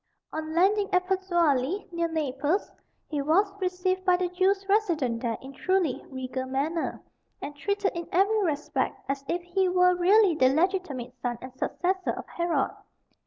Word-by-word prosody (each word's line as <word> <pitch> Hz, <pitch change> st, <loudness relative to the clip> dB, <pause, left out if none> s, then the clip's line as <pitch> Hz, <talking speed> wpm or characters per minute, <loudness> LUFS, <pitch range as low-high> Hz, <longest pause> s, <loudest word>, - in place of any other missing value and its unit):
On 315 Hz, 0 st, -4 dB
landing 395 Hz, +3 st, +3 dB
at 365 Hz, 0 st, +2 dB
Pozzuoli, 345 Hz, -3 st, +1 dB
near 340 Hz, -1 st, 0 dB
Naples, 305 Hz, +2 st, -1 dB, 0.4 s
he 295 Hz, -2 st, -2 dB
was 380 Hz, +8 st, +2 dB
received 370 Hz, 0 st, 0 dB
by 365 Hz, -1 st, +4 dB
the 360 Hz, -1 st, -1 dB
Jews 385 Hz, +2 st, +1 dB
resident 330 Hz, -, +1 dB
there 230 Hz, -2 st, -1 dB
in 270 Hz, +1 st, -10 dB
truly 365 Hz, -2 st, 0 dB
regal 260 Hz, 0 st, -4 dB
manner, 290 Hz, +6 st, -2 dB, 0.4 s
and 290 Hz, -, -6 dB
treated 400 Hz, +6 st, -1 dB
in 340 Hz, -2 st, -6 dB
every 405 Hz, +4 st, +3 dB
respect 300 Hz, -4 st, -1 dB
as 275 Hz, 0 st, -2 dB
if 350 Hz, +4 st, -1 dB
he 365 Hz, +1 st, +1 dB
were 360 Hz, 0 st, +4 dB
really 380 Hz, +2 st, +5 dB
the 260 Hz, -5 st, +4 dB
legitimate 310 Hz, -7 st, -1 dB
son 240 Hz, -1 st, -2 dB
and 255 Hz, 0 st, -10 dB
successor 370 Hz, +7 st, -1 dB
of -, -, -7 dB
Herod. 345 Hz, -1 st, 0 dB
345 Hz, 160 wpm, -27 LUFS, 280-375 Hz, 0.4 s, really